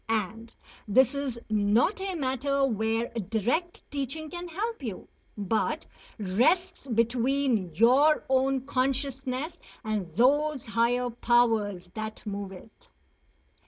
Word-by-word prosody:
And 225 +1 -2 0.4
this 255 +6 +4
is 280 -4 -3
not 215 - +2
a 385 -1 -2
matter 275 -1 0
where 225 -1 0 0.2
direct 250 - -1
teaching 290 +2 -4
can 350 0 -6
help 420 +5 -3
you, 220 -8 -6 0.3
but 210 +2 -1 0.3
rests 275 - +1
between 235 - +1
your 265 - +5
own 265 0 +2
consciousness 270 +3 -1 0.2
and 210 -6 -2
those 290 +4 +3
higher 235 +2 +1
powers 225 -6 +1
that 220 0 -6
move 200 -2 -4
it. 195 +4 -14
245 Hz, 110 wpm, -28 LUFS, 220-280 Hz, 0.4 s, your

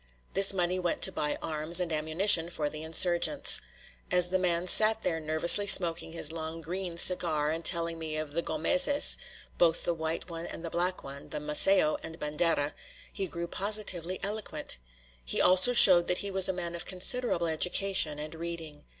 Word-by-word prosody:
This 195 +1 +3
money 180 -1 -4
went 175 -2 -4
to - - +6
buy 150 0 -5
arms 155 +2 0
and 175 -3 -5
ammunition 165 +3 +1
for 150 -4 -5
the 155 +1 -10
insurgents. 175 - +2 0.5
As 180 -1 +2
the 185 +1 -3
man 175 -1 -2
sat 215 +4 +4
there 165 -2 -4
nervously 160 +6 +4
smoking 170 -4 +5
his 160 -2 -1
long, 160 0 -8
"green" 175 +1 -7
cigar, 160 -4 +2
and 165 +1 -6
telling 170 -1 -1
me 155 -1 -7
of 155 -2 -7
the 170 - -3
Gómezes, 275 - +4 0.4
both 165 -1 0
the 170 - -3
white 160 +1 -7
one 170 -1 -8
and 165 - -9
the 165 - -8
black 180 +1 -4
one, 140 +1 -11
of - - -12
Macéo 150 +3 0
and 160 0 -10
Bandera, 150 -1 -3 0.4
he 195 - -5
grew 170 0 -8
positively 190 -3 -4
eloquent. 195 - -5 0.4
He - - -2
also 185 +6 +4
showed 185 -7 +7
that 180 - -1
he 200 - -5
was 190 -1 +3
a - - 0
man 175 -2 -7
of 170 0 -7
considerable 185 0 -1
education 170 -1 -1
and 150 +1 -9
reading. 165 -3 -10
170 Hz, 180 wpm, -26 LUFS, 160-185 Hz, 0.5 s, showed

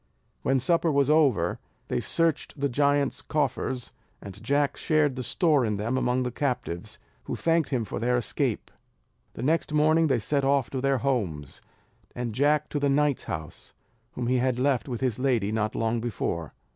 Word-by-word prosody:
When 135 0 +2
supper 165 +4 +2
was 140 0 +3
over, 135 - +3 0.3
they - - -1
searched 165 -3 -1
the 140 - +1
giants' 140 +1 +1
coffers, 130 -4 -2 0.3
and 100 -2 -10
Jack 140 -1 +1
shared 155 -4 +1
the 130 - -4
store 145 +3 +2
in 105 -3 -1
them 110 +5 -1
among 130 0 +1
the 125 - -2
captives, 120 -10 -3 0.3
who - - -3
thanked 165 -1 +1
him 125 -5 -1
for - - -5
their 125 +1 +1
escape. 120 - -2 0.6
The - - -5
next 155 +3 +1
morning 155 +2 +4
they 135 -4 +2
set 140 +5 0
off 135 -4 +1
to 130 - -2
their 135 0 +2
homes, 100 - -2 0.5
and 120 -2 -3
Jack 145 +4 +2
to 145 - -2
the 140 0 +1
knight's 145 -1 +1
house, 75 -6 -7 0.4
whom 125 - -3
he 125 +2 +2
had 125 0 +1
left 135 0 +1
with 120 -1 -4
his 125 -3 0
lady 120 -6 +1
not 110 -1 -1
long 115 +1 0
before. 85 -8 -3
130 Hz, 180 wpm, -26 LUFS, 120-145 Hz, 0.6 s, morning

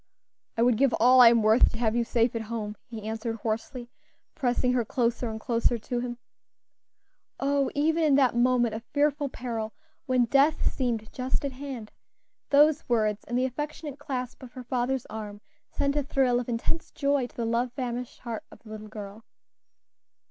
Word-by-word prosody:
"I 230 - +3
would 240 -2 +4
give 275 0 +3
all 255 +2 +6
I 240 - +10
am 230 -1 +3
worth 220 +3 +5
to - - -5
have 230 -1 +1
you 240 - +2
safe 230 0 +1
at 230 - -1
home," 215 -1 -4
he 225 -4 -8
answered 225 +1 -3
hoarsely, 235 +3 -4 0.4
pressing 250 -3 +1
her 245 -2 +2
closer 235 +1 -1
and 220 0 -5
closer 235 +1 +1
to 240 +2 -3
him. 240 0 -4 1.2
O! 280 0 +1
even 320 +3 +2
in 295 -3 +4
that 265 -4 +3
moment 240 -1 +3
of 220 +1 -5
fearful 290 0 0
peril, 230 -4 -4 0.3
when 255 -2 +3
death 280 +6 +3
seemed 235 -5 -2
just 260 +3 -2
at 280 - -2
hand, 260 -5 -7 0.6
those 300 +1 +4
words, 215 -3 +1
and 240 - -2
the 255 - +2
affectionate 295 +2 -5
clasp 255 -4 -5
of 250 -2 -11
her 255 - -8
father's 250 +1 -1
arm, 210 -2 -7 0.3
sent 280 0 -1
a 295 - +2
thrill 265 -3 +2
of 245 - -5
intense 240 +8 -2
joy 280 -3 0
to - - -24
the 235 - -2
love 235 +2 0
famished 245 -1 -5
heart 230 -3 -5
of - - -16
the 220 - -14
little 215 0 -8
girl. 210 0 -9
245 Hz, 185 wpm, -27 LUFS, 230-270 Hz, 1.2 s, I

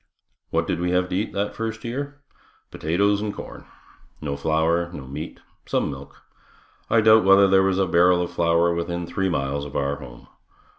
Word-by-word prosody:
What - - 0
did - - -2
we 90 +1 -1
have 90 0 +1
to - - -2
eat 105 +4 -1
that 100 +1 -2
first 115 0 -4
year? 140 +4 -5 0.5
Potatoes 100 +6 +1
and 105 -1 -2
corn. - - -10 0.5
No 70 -2 -3
flour, 80 +3 0
no 70 -6 -8
meat, 70 +4 -7 0.3
some - - 0
milk. 70 0 -11 0.7
I 115 - +4
doubt 110 0 +6
whether 95 +1 +6
there 95 0 +5
was 95 -1 +1
a 95 - +2
barrel 90 +1 +4
of 85 - -5
flour 85 0 +2
within 85 0 -3
three 95 +2 -1
miles 70 -3 -2
of 70 -1 -9
our 70 0 -1
home. - - -12
90 Hz, 185 wpm, -23 LUFS, 80-100 Hz, 0.7 s, doubt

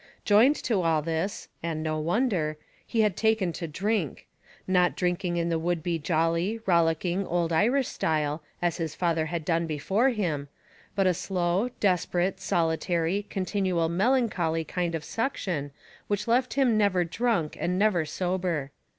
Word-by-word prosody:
Joined 225 +8 +6
to 215 -6 +1
all 160 -3 +2
this 165 +5 -2
and 160 -2 -3
no 155 -1 -1
wonder 170 -3 0 0.3
he 225 - +1
had 210 -4 +2
taken 220 -6 +1
to 170 - -5
drink, 185 - -2 0.4
not 180 -1 +3
drinking 180 -1 -1
in 170 0 0
the 165 -1 0
would 170 -1 -1
be 170 -2 -1
jolly, 165 +6 0
rollicking, 170 +1 +2
old 170 -1 0
Irish 245 +10 +3
style, 155 -1 -1 0.2
as 175 -2 +1
his 160 -3 -3
father 165 -3 0
had 165 -1 -4
done 165 0 +1
before 190 - +1
him; 170 - -2 0.5
but 195 -1 +2
a 185 - +4
slow, 180 +5 0
desperate, 185 -1 +1
solitary, 170 +2 0
continual 185 -3 0
melancholy 185 -5 +1
kind 170 +1 -2
of 160 - -4
suction, 180 - -2 0.4
which 205 +1 -1
left 250 +2 +2
him 250 -6 +3
never 195 -4 +3
drunk 175 -2 -1
and 180 +1 0
never 195 -4 +3
sober. 175 -3 -2
175 Hz, 150 wpm, -27 LUFS, 165-200 Hz, 0.5 s, Joined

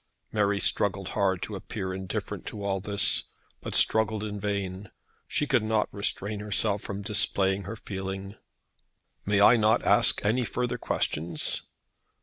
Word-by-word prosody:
Mary 100 -1 +1
struggled 95 -1 0
hard 95 -2 0
to 105 - -5
appear 95 0 -5
indifferent 95 -1 -5
to 105 - -6
all 95 -1 0
this, 100 +2 +2 0.4
but - - -5
struggled 110 -1 +2
in 105 -1 -5
vain. 100 -1 -3 0.4
She 150 - 0
could 130 -4 +2
not 110 0 0
restrain 100 0 -1
herself 105 0 +1
from 100 +1 -6
displaying 100 -2 +2
her 110 +4 -5
feeling. 95 -1 -6 0.9
"May 100 -1 +3
I 115 +4 +7
not 110 0 +3
ask - - +4
any 120 +5 +2
further 125 +1 -2
questions?" 80 -4 -1
100 Hz, 140 wpm, -27 LUFS, 95-110 Hz, 0.9 s, I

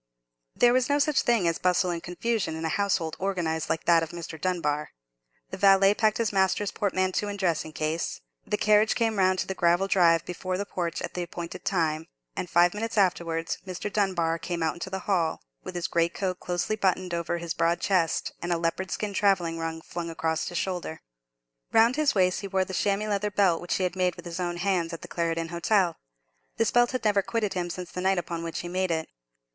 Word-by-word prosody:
There 240 0 +5
was 255 0 +2
no 285 - +3
such 290 -1 +2
thing 230 -7 +2
as 165 - 0
bustle 180 0 +2
and 170 -1 -3
confusion 180 -1 -2
in 160 0 -4
a - - 0
household 180 -4 0
organized 165 -5 -1
like 160 - -1
that 170 -1 +5
of 165 - -3
Mr. 165 -2 -8
Dunbar. 150 -5 -1 0.6
The 190 - -5
valet 195 0 +6
packed 215 0 +2
his 230 -3 0
master's 195 +1 +2
portmanteau 185 0 0
and 205 0 -4
dressing 170 -5 0
case; 155 - -2 0.3
the 210 - 0
carriage 215 +1 +4
came 225 -3 0
round 185 0 +3
to - - -1
the 190 - -3
gravel 175 +1 +2
drive 170 -4 +4
before 185 +1 -3
the 200 - -2
porch 170 -4 -3
at - - -5
the 180 - -3
appointed 170 0 -5
moment; 160 -3 0 0.3
and 180 - -4
five 175 +1 +4
minutes 225 +1 -4
afterwards 170 -4 +1
Mr. 185 +2 -5
Dunbar 170 -5 +1
came 170 -1 -3
out 160 - +1
into 175 +2 -6
the 190 0 -4
hall, 175 - 0 0.2
with - - -7
his 175 - -2
greatcoat 180 +2 0
closely 180 +4 -1
buttoned 185 -3 0
over 170 0 -1
his 170 -1 -4
broad 170 +1 +1
chest, 180 -5 +1
and 175 - -3
a 170 - +2
leopard 165 +3 -2
skin 210 -1 -3
travelling 180 -5 +1
rug 165 0 -4
flung 170 -1 -5
across 160 -1 -1
his 175 - -4
shoulder. 180 -4 -3 0.7
Round 230 +3 +5
his 300 -4 +2
waist 185 -2 +2
he 200 - -5
wore 190 -1 +1
the 190 - -8
chamois 200 +2 +1
leather 210 0 0
belt 195 -5 +2
which 175 - -1
he 190 - 0
had 180 0 -1
made 180 -2 +1
with 175 - -11
his 170 +1 -5
own 175 -1 -2
hands 175 -2 0
at 165 - -7
the - - -7
Clarendon 165 -1 -2
Hotel. 175 0 +1 0.6
This 225 - +2
belt 240 0 +4
had 255 -3 -3
never 205 -2 +4
quitted 215 -1 -1
him 175 -2 -2
since 180 0 -6
the 180 - -4
night 190 +1 +2
upon 170 -1 -3
which 165 -1 -4
he 175 - -6
made 185 +1 -1
it. 160 -1 -1
180 Hz, 215 wpm, -27 LUFS, 170-200 Hz, 0.7 s, valet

